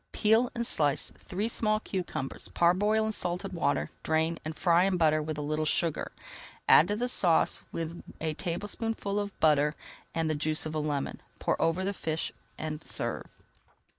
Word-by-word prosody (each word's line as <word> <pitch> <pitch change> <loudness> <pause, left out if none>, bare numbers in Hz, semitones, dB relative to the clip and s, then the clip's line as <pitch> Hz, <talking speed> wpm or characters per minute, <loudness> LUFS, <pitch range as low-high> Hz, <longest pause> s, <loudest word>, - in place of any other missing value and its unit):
Peel 225 +3 +3
and 235 0 -1
slice 145 - +2
three 200 +5 -2
small 215 -2 +1
cucumbers, 180 -10 -4
parboil 205 +6 +3
in 220 - 0
salted 185 -1 -1
water, 75 - 0
drain, 160 +1 +1
and 155 0 -5
fry 175 0 +4
in 195 -2 +1
butter 155 -2 +3
with 155 0 -4
a 150 - -3
little 155 +1 -1
sugar. 160 +1 0 0.6
Add 160 - +8
to 205 - 0
the 245 +3 -1
sauce 175 -9 +3
with 165 +1 -4 0.2
a 160 -1 -1
tablespoonful 205 +4 -2
of 205 -1 -5
butter 150 -1 +4 0.4
and 165 -1 +1
the 155 - +1
juice 155 +1 0
of 155 - -4
a 155 - -1
lemon. 145 -2 -2 0.2
Pour - - -1
over 165 +3 +2
the 200 - 0
fish 160 -4 -2 0.3
and 155 -1 -4
serve. - - -2
165 Hz, 170 wpm, -29 LUFS, 155-200 Hz, 0.6 s, Add